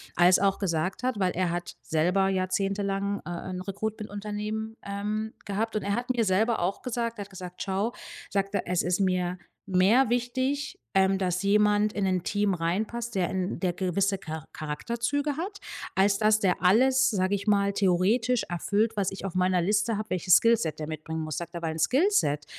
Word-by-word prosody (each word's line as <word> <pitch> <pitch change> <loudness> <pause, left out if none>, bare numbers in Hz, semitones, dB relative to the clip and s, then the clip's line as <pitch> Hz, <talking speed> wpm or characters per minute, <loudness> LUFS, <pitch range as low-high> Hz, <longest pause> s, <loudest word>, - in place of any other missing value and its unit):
als 175 +2 +6
auch 195 0 +2
gesagt 180 -1 -1
hat, 250 -4 -1
weil 185 -2 +2
er 180 0 0
hat 175 0 -4
selber 180 +5 +1
jahrzehntelang, 195 +1 -1
äh, - - -6 0.2
'n 185 0 -4
Recruitment-Unternehmen, 210 +2 -4
ähm, 210 +2 -3
gehabt. 215 +3 -2
Und 215 - 0
er 200 0 0
hat 245 +2 -4
mir 240 -3 +1
selber 220 +4 +2
auch 180 +3 -1
gesagt, 235 -2 -2
er 205 - -4
hat 200 - -15
gesagt: 180 -1 -7
„Schau“, 200 +4 -1 0.4
sagt 195 0 -1
er, - - -1
„es 180 -1 +1
ist 180 +1 0
mir 180 -1 0 0.3
mehr 200 +7 +4
wichtig, 260 +4 -1 0.2
ähm, 190 0 +3
dass 185 0 -1
jemand 210 +1 +3
in 200 - -1
'nen 185 -2 0
Team 205 -1 +1
reinpasst, 220 +8 -2
der 185 -3 0
in 185 0 -2
der 180 -2 0
gewisse 195 +2 0
Char 160 -1 -6
Charakterzüge 235 - -2
hat, 395 +5 -4 0.4
als 200 +1 +3
dass 215 +1 +3
der 185 -3 0
alles, 260 +7 +5
sage 190 -1 +1
ich 200 0 -5
mal, 200 -1 +2
theoretisch 210 +6 +2
erfüllt, 205 +5 0
was 195 -2 +1
ich 195 0 -7
auf 190 - -5
meiner 185 0 +2
Liste 210 +4 +1
habe, 215 +1 -5
welches 180 0 +5
Skillset 225 -10 +2
der 155 - -4
mitbringen 160 +1 -5
muss“, 155 -2 -4
sagt 170 0 -6
er, 170 - -5
weil 160 -1 -2
'n - - -6
Skillset 250 - +2
200 Hz, 190 wpm, -27 LUFS, 180-220 Hz, 0.4 s, als